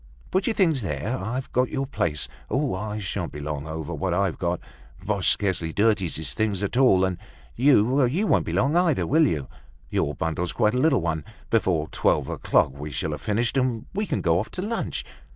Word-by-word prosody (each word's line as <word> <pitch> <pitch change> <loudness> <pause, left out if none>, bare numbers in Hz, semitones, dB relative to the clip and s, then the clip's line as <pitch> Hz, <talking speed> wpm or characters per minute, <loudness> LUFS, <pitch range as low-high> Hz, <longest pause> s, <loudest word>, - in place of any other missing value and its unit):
"Put 190 +1 +1
your 225 - +1
things 165 -9 +3
there, 95 - -2
I've 120 +6 -4
kept 125 0 +2
your 135 0 -2
place. 95 - -1 0.2
Oh, 135 -2 0
I 105 +3 -3
sha'n't 95 -4 -3
be 75 - -7
long 75 0 -4
over 80 +1 -5
what 85 +3 -1
I've 95 -2 0
got. 85 -1 -1 0.5
Boche 100 -2 +1
scarcely 90 -5 0
dirties 105 -4 +2
his 80 0 -3
things 105 -3 0
at 100 - -2
all. 120 -8 +5
And 95 -2 -2 0.4
you, 130 0 +4
you 175 - 0
won't - - +2
be - - -1
long 140 +5 +2
either, 175 -5 +3
will 155 +2 +4
you? 75 - -2 0.4
Your 75 - 0
bundle's 85 +2 -2
quite 105 0 +2
a 125 - +1
little 140 - +3
one. 80 -2 -1 0.3
Before 90 -9 +2
twelve - - +1
o'clock - - +2
we 75 +2 -6
shall 70 - -3
have - - -5
finished, 115 +4 0
and 125 -4 0
we 205 +2 -1
can - - -1
go 85 -1 +3
off 105 - -4
to 185 - -4
lunch. 225 +3 -3
105 Hz, 205 wpm, -25 LUFS, 85-130 Hz, 0.5 s, all